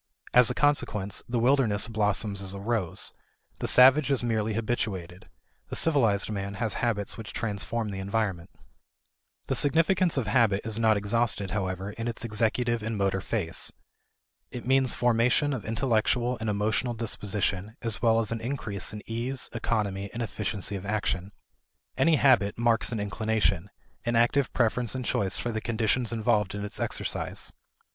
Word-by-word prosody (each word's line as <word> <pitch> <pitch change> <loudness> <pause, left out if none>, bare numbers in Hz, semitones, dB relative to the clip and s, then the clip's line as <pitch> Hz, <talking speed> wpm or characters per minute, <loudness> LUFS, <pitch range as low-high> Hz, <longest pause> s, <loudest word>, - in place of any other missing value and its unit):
As 125 -1 +6
a - - -1
consequence, 105 -9 0
the 120 - -1
wilderness 115 -4 +3
blossoms 105 -2 0
as 95 0 -5
a - - -6
rose. 105 -4 0 0.5
The - - -2
savage 135 +3 +6
is 135 -3 +1
merely 110 -2 -1
habituated; 95 -6 -3 0.4
the - - -6
civilized 115 -11 +3
man 100 -1 -4
has 110 0 -1
habits 110 -3 -1
which 105 -3 -8
transform 110 0 -2
the 95 -1 -5
environment. 95 -3 -2 1.0
The - - -1
significance 165 +4 +3
of 130 - 0
habit 105 -2 +2
is 110 0 -1
not 110 -2 +4
exhausted, 105 -1 0
however, 95 -1 -3
in 115 +3 -5
its 120 +1 -3
executive 115 +2 0
and 110 0 -3
motor 95 -1 0
phase. 95 -5 0 0.8
It 125 - -8
means 130 0 +3
formation 120 +4 +2
of 120 -6 -5
intellectual 120 +1 +1
and 110 -1 -2
emotional 110 +4 0
disposition 105 -2 -2
as 115 -2 -3
well 115 -1 +4
as 110 -1 -1
an 115 -1 -3
increase 110 -6 -4
in 105 - -7
ease, 120 +3 -3
economy, 100 -4 -2
and 120 - -2
efficiency 105 -3 -3
of 95 - -6
action. 100 -2 -2 0.6
Any 165 -1 +4
habit 125 -9 +3
marks 115 0 +2
an 115 - -2
inclination 105 -3 0 0.3
an 120 -1 -1
active 120 +3 +2
preference 120 0 0
and 130 -1 -4
choice 95 -3 +2
for 120 - -2
the 110 -1 -3
conditions 115 +1 0
involved 110 -3 0
in 100 0 -4
its 105 - -5
exercise. - - -2
110 Hz, 160 wpm, -27 LUFS, 100-120 Hz, 1.0 s, As